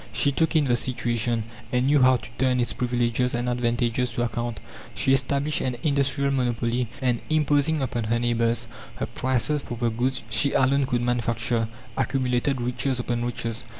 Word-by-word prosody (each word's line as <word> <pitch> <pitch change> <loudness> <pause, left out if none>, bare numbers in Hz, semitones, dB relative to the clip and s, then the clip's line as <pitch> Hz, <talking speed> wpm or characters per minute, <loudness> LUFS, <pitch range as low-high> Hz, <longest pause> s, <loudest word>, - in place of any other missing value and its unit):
She 140 - +2
took 160 +4 0
in 155 -2 +4
the 120 -2 +3
situation, 120 -1 -1 0.3
and 125 0 +2
knew 145 0 +4
how 130 0 +6
to - - -11
turn 130 -1 +2
its 120 - 0
privileges 120 0 0
and 120 +1 -2
advantages 120 0 0
to 120 - -1
account. 120 -1 -3 0.4
She 135 - +2
established 140 +2 +1
an 125 -2 -2
industrial 140 -1 +1
monopoly, 120 -2 0 0.2
and, 120 -2 +1
imposing 150 -1 +2
upon 120 -3 -2
her 115 +2 +1
neighbours 120 0 +1 0.3
her - - -2
prices 130 +3 0
for 120 - -7
the 120 0 0
goods 125 +4 -1
she 115 +6 +2
alone 135 +1 +3
could 120 -2 0
manufacture, 115 -1 0 0.3
accumulated 130 0 0
riches 125 +1 -1
upon 120 -1 -1
riches. 115 -2 -3
125 Hz, 170 wpm, -25 LUFS, 120-135 Hz, 0.4 s, how